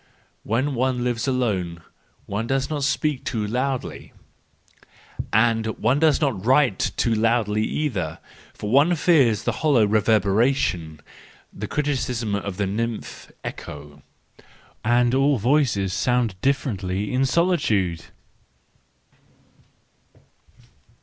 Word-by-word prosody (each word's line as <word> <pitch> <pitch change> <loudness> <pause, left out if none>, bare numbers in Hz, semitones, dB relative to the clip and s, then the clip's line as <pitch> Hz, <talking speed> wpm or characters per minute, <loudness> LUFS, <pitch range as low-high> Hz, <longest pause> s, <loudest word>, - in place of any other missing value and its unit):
—When 130 +7 -1
one 130 0 0
lives 120 0 -1
alone 95 -10 -1 0.4
one 105 +3 -3
does 135 +2 -1
not 145 -2 -2
speak 145 0 0
too 110 -3 -2
loudly, 130 +4 -3 1.2
and 115 0 +2
one 125 +7 +2
does 155 -2 +3
not 135 - -1
write 130 -4 +3 0.2
too 115 - +1
loudly 110 -1 +1
either, 100 - -2 0.3
for 105 - -6
one 145 +7 +4
fears 140 - +3
the - - 0
hollow 140 -8 +4
reverberation 105 - +1 0.5
—the - - -6
criticism 125 -7 -2
of 100 -2 -3
the 100 - 0
nymph 115 +3 -4
Echo.—And 75 - -4
all 135 +1 +3
voices 110 -6 +1
sound 125 -4 +1
differently 105 -8 -1
in 130 +1 +2
solitude! 130 - +1
120 Hz, 105 wpm, -23 LUFS, 105-135 Hz, 1.2 s, one